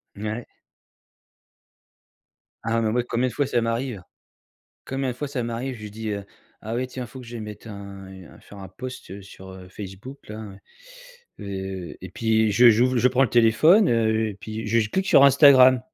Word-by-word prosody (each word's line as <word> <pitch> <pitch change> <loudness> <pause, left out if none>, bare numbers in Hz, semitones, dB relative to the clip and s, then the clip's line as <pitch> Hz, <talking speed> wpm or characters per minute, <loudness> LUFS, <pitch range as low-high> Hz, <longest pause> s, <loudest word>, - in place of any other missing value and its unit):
Mouais. 110 +3 -5 2.2
Ah 115 0 0
mais 110 - 0
moi, 120 +2 +1
combien 125 +2 0
de - - -7
fois 140 +4 0
ça 120 - +1
m'arrive. 115 -3 -3 0.8
Combien 135 0 -2
de 125 - -4
fois 145 - -4
ça 130 -4 -3
m'arrive, 120 +2 -4
je 105 - -7
dis, 110 +1 -6
heu: 100 -1 -4 0.4
«Ah 110 +2 -5
ouais, 125 +2 -1
tiens, 125 -1 -7
faut 130 +3 -11
que 120 - -12
je 120 0 -7
mette 105 +1 -9
un, 100 -2 -9
heu, 90 -7 -13
faire 100 - -14
un 95 -1 -9
post 100 -2 -9
sur, 95 0 -13
heu, 95 -1 -12
Facebook-là», 105 +1 -9 0.8
heu 95 -2 -6
et 95 - -8
puis 110 0 +1
je 120 +4 +7
j'ouvre 125 +3 +2
je 125 - +4
prends 130 +1 +2
le 115 - -3
téléphone, 140 - +5
heu 110 -1 +1
et - - -9
puis 110 +1 -6
j 115 +2 +2
je 105 - -5
clique 190 0 -1
sur 140 - +6
Instagram 130 -3 +7
115 Hz, 185 wpm, -24 LUFS, 100-125 Hz, 2.2 s, je